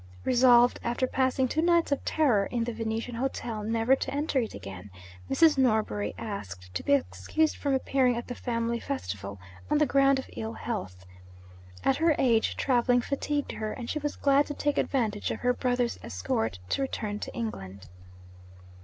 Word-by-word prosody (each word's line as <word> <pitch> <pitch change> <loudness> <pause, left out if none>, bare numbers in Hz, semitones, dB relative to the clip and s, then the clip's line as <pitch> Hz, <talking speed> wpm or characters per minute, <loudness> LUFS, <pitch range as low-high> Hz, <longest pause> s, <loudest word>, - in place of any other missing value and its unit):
Resolved, 245 -1 +5
after 240 +2 0
passing 260 0 +1
two 310 +5 0
nights 340 -2 +3
of 280 - 0
terror 245 -11 +2
in 240 -2 -1
the 240 0 -3
Venetian 225 +2 -3
hotel, 235 -3 -3
never 225 +4 +2
to - - -4
enter 290 -1 0
it 225 -3 -3
again, 95 0 -9 0.4
Mrs. 315 -4 +4
Norbury 220 -4 +1
asked 95 - -7
to - - -2
be 285 - +2
excused 310 +3 +1
from 280 -2 0
appearing 260 -2 +2
at 240 - -4
the 245 - -4
family 235 -1 -2
festival, 100 - -5 0.3
on 300 - +3
the 300 - +4
ground 275 0 +4
of 265 - -5
ill 220 +1 -4
health. 100 - -5 0.8
At 270 - +2
her 325 -1 +3
age, 230 -4 +2
travelling 245 -1 +3
fatigued 285 +2 -2
her, 215 -1 -4
and 240 - -7
she 305 - -2
was 295 0 -3
glad 280 0 +3
to 290 - -5
take 290 -1 0
advantage 220 -6 0
of - - -4
her 250 0 +2
brother's 245 -1 -1
escort 95 +2 -2
to - - 0
return 210 -6 -3
to - - -6
England. 100 - -6
245 Hz, 175 wpm, -28 LUFS, 215-275 Hz, 0.8 s, Resolved